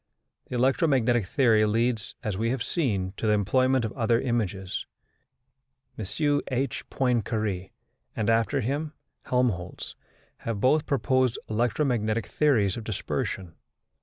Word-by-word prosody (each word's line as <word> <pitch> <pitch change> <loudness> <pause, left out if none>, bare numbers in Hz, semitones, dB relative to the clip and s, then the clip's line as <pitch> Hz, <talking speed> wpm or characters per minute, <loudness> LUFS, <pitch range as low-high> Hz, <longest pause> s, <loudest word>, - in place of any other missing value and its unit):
The - - -5
electromagnetic 125 - +2
theory 115 -3 +4
leads, 115 0 0
as 105 -3 -2
we 115 +4 0
have 125 -1 -1
seen, 100 - -1
to 110 - -1
the 105 - +4
employment 130 +5 +2
of 110 - -4
other 115 -2 +2
images. 105 -7 -2 1.1
M.H. 135 - -1
Poincaré, 110 -7 -1 0.5
and, 110 - -1
after 115 +5 +2
him, 145 +6 -2 0.3
Helmholtz, 120 -9 -1 0.4
have 115 -3 -4
both 145 +7 +3
proposed 130 -3 +2
electromagnetic 115 -1 0
theories 115 -11 +2
of 115 - -5
dispersion. 95 -4 -3
115 Hz, 115 wpm, -27 LUFS, 105-130 Hz, 1.1 s, theory